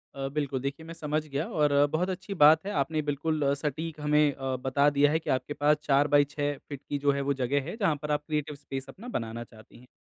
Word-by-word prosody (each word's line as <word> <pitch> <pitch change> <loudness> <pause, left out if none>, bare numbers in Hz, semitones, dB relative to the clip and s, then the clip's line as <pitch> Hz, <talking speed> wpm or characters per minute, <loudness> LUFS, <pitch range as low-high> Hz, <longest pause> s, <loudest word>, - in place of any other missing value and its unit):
अ, 135 0 -3
बिल्कुल 140 -3 -1
देखिए 140 +4 -4
मैं 165 - -8
समझ 155 -1 -2
गया 140 +2 -2
और 145 -1 +3
बहुत 180 +4 0
अच्छी 190 +2 -5
बात 160 +4 +7
है 205 - -3
आपने 155 +2 -1
बिल्कुल 150 +1 -1
सटीक 155 +2 -4
हमें 150 -1 +3
अ, 135 -1 -3
बता 135 +3 +2
दिया 145 0 +3
है 160 - +2
कि - - -7
आपके 130 +3 0
पास 150 +1 +3
4 145 0 +3
बाय 145 0 +5
6 145 0 -2 0.2
फीट 140 -1 -6
की 145 - -1
जो 145 0 +3
है 140 0 -1
वो 140 +1 0
जगह 135 +1 0
है, - - -5
जहाँ 190 -9 +2
पर 150 - -3
आप 150 0 0
क्रिएटिव 150 -1 -2
स्पेस 135 -1 -7
अपना 230 +6 -11
बनाना 115 0 -5
चाहती 110 0 -17
हैं। 125 - -18
145 Hz, 245 wpm, -28 LUFS, 140-155 Hz, 0.2 s, बात